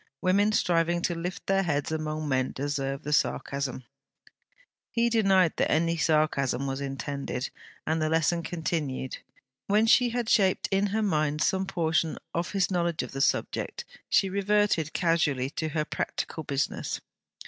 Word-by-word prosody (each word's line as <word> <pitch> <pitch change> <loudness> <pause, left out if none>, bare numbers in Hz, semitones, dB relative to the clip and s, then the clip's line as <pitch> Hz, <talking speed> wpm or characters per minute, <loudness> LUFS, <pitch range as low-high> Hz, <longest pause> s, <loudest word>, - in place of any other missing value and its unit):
'Women 200 +3 +3
striving 175 -3 +1
to 175 - +1
lift 175 +2 -5
their 195 0 +2
heads 150 -5 -1
among 155 -1 -2
men 130 -2 0
deserve 135 -1 -3
the 150 - -2
sarcasm.' 140 -3 -1 1.1
He 235 0 +1
denied 195 -6 +4
that - - +1
any 165 +2 +2
sarcasm 150 -4 +1
was 135 0 -3
intended, 140 -1 -4 0.3
and 160 0 0
the 155 - +1
lesson 165 +1 +2
continued. 155 -6 -3 0.5
When 210 +2 +4
she 245 +2 +5
had 240 -1 -2
shaped 195 -5 +3
in 195 +1 +2
her 215 +2 0
mind 150 -5 +1
some 190 0 +1
portion 165 -3 0 0.2
of 170 +3 -2
his 195 -2 +1
knowledge 170 -2 0
of - - -7
the 135 - -3
subject, - - -1 0.2
she 195 - +4
reverted 200 -4 +1
casually 150 -7 +1
to 160 +1 -3
her 150 0 -1
practical 160 - -3
business. 140 -1 -2
165 Hz, 150 wpm, -28 LUFS, 145-190 Hz, 1.1 s, she